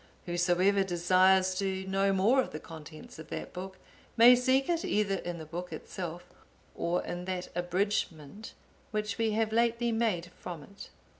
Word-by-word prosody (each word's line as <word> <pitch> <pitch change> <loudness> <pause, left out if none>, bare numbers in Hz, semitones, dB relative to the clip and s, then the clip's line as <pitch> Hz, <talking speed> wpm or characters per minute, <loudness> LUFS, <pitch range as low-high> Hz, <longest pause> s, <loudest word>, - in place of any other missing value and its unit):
Whosoever 180 +3 +2
desires 185 +1 +3
to 190 -1 -2
know 195 +1 +1
more 210 +8 +4
of - - -4
the 155 - -7
contents 155 0 -11
of 160 - -10
that - - -6
book, 190 +1 -7 0.4
may 240 +2 +9
seek 260 +2 +2
it 340 -1 0
either 200 -2 +1
in 175 -1 -5
the 160 - -8
book 175 +3 -6
itself, 175 +2 -6 0.5
or 175 +1 -1
in 175 0 -5
that 185 -1 -4
abridgement 175 0 -2 0.3
which 210 -1 -3
we 225 -1 +1
have 220 0 0
lately 235 +1 +2
made 210 -7 0
from 170 -4 -7
it. 200 +4 -12
190 Hz, 160 wpm, -30 LUFS, 175-215 Hz, 0.5 s, may